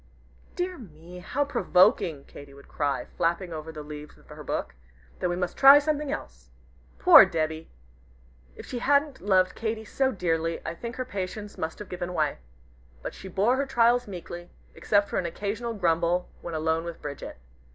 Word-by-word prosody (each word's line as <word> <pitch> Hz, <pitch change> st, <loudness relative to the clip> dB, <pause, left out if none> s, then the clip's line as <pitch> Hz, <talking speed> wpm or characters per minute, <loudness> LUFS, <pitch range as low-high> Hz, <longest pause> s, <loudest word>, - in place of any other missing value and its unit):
"Dear 360 Hz, 0 st, -3 dB
me, 175 Hz, -4 st, -12 dB
how 275 Hz, +11 st, -1 dB
provoking!" 180 Hz, -, +3 dB
Katy 140 Hz, -1 st, -13 dB
would 140 Hz, -, -16 dB
cry, 140 Hz, -2 st, -2 dB
flapping 170 Hz, +1 st, -2 dB
over 155 Hz, 0 st, -6 dB
the 155 Hz, -1 st, -8 dB
leaves 150 Hz, 0 st, -10 dB
of -, -, -23 dB
her -, -, -10 dB
book; -, -, -3 dB, 0.5 s
"then 180 Hz, -, 0 dB
we 175 Hz, -, -1 dB
must 180 Hz, -1 st, -3 dB
try 275 Hz, +1 st, +9 dB
something 295 Hz, -1 st, 0 dB
else." -, -, -7 dB, 0.5 s
Poor -, -, +9 dB
Debby! 160 Hz, -3 st, -2 dB, 0.9 s
If -, -, -10 dB
she 245 Hz, -, -5 dB
hadn't 285 Hz, +1 st, +2 dB
loved 185 Hz, -2 st, +3 dB
Katy 220 Hz, -1 st, -3 dB
so 265 Hz, +4 st, 0 dB
dearly, 165 Hz, -4 st, -1 dB
I -, -, -3 dB
think 235 Hz, +8 st, -7 dB
her 255 Hz, -, -3 dB
patience 205 Hz, -1 st, -5 dB
must 160 Hz, 0 st, -4 dB
have 210 Hz, -, -8 dB
given 180 Hz, 0 st, -5 dB
way. 155 Hz, -3 st, 0 dB, 0.6 s
But -, -, -5 dB
she 195 Hz, -, -10 dB
bore 205 Hz, +7 st, +2 dB
her 275 Hz, 0 st, -1 dB
trials 240 Hz, -1 st, +3 dB
meekly, 175 Hz, -2 st, -8 dB, 0.2 s
except 205 Hz, -1 st, +2 dB
for -, -, -1 dB
an 180 Hz, -, -2 dB
occasional 220 Hz, +6 st, -4 dB
grumble 175 Hz, -1 st, +1 dB
when 170 Hz, -2 st, -5 dB
alone 160 Hz, +1 st, 0 dB
with 170 Hz, -1 st, -7 dB
Bridget. 140 Hz, -, -7 dB
180 Hz, 175 wpm, -27 LUFS, 160-230 Hz, 0.9 s, try